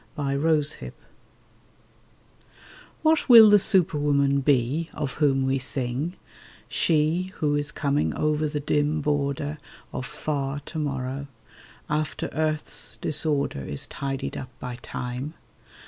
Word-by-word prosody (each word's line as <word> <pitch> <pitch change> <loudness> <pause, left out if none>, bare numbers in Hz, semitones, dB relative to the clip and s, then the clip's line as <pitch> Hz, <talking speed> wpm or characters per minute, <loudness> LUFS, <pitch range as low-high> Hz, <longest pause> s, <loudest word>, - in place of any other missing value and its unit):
THE 140 -2 -2
SUPERWOMAN 150 +1 0 2.1
WHAT 315 -2 +3
will 225 -3 +10
the 205 - +7
superwoman 145 -7 +3
be, 140 +4 +1
of 140 -3 -3
whom 135 -2 +3
we 135 0 +1
sing— 130 +6 -2 0.5
She 165 +3 +1
who 145 -1 0
is 145 0 -2
coming 145 -1 0
over 150 0 +1
the 150 0 -3
dim 150 +1 0
border 145 0 -1 0.3
Of 125 - -4
Far 140 0 -3
To 155 +3 -6
morrow, 135 -1 -3 0.6
after 150 0 -2
earth's 155 0 -1
disorder 145 - 0
Is 70 +1 -2
tidied 135 -1 -4
up 130 - -6
by 125 -1 -6
Time? 125 +6 -5
145 Hz, 115 wpm, -25 LUFS, 135-155 Hz, 2.1 s, will